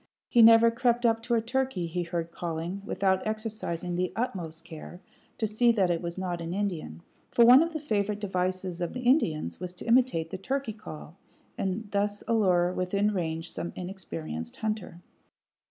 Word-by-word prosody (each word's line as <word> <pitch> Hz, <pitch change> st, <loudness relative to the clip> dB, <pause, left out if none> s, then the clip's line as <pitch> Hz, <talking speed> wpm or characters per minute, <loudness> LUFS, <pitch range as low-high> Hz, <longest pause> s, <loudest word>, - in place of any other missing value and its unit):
He 240 Hz, -, +4 dB
never 230 Hz, +1 st, +8 dB
crept 240 Hz, 0 st, +1 dB
up 225 Hz, -1 st, +3 dB
to 235 Hz, +1 st, 0 dB
a 225 Hz, -, +2 dB
turkey 260 Hz, -6 st, -1 dB
he 170 Hz, +2 st, -2 dB
heard 170 Hz, -1 st, -3 dB
calling, 170 Hz, +3 st, -4 dB
without 190 Hz, -1 st, 0 dB
exercising 215 Hz, -6 st, -3 dB
the 180 Hz, 0 st, 0 dB
utmost 170 Hz, -8 st, -4 dB
care 170 Hz, +1 st, -9 dB, 0.4 s
to 220 Hz, -, 0 dB
see 220 Hz, +3 st, +3 dB
that 190 Hz, -5 st, +2 dB
it 170 Hz, -, -1 dB
was 170 Hz, 0 st, -5 dB
not 180 Hz, -2 st, -3 dB
an 165 Hz, +2 st, -4 dB
Indian; 170 Hz, -, -3 dB, 0.3 s
for 235 Hz, -, +5 dB
one 250 Hz, +4 st, +9 dB
of 335 Hz, +1 st, 0 dB
the 315 Hz, -, -3 dB
favorite 210 Hz, -7 st, -1 dB
devices 185 Hz, -2 st, -2 dB
of 175 Hz, -, -2 dB
the 250 Hz, -, -5 dB
Indians 165 Hz, -, +1 dB
was 180 Hz, 0 st, -6 dB
to -, -, -9 dB
imitate 235 Hz, -9 st, +2 dB
the 190 Hz, -, -5 dB
turkey 265 Hz, +2 st, -2 dB
call, 170 Hz, -5 st, -10 dB, 0.4 s
and 195 Hz, +3 st, -2 dB
thus 205 Hz, 0 st, -1 dB
allure 185 Hz, -6 st, +3 dB
within 200 Hz, +4 st, 0 dB
range 165 Hz, -2 st, -3 dB
some 170 Hz, -, -5 dB
inexperienced 85 Hz, -, -6 dB
hunter. 215 Hz, -5 st, -4 dB
190 Hz, 175 wpm, -28 LUFS, 170-225 Hz, 0.4 s, one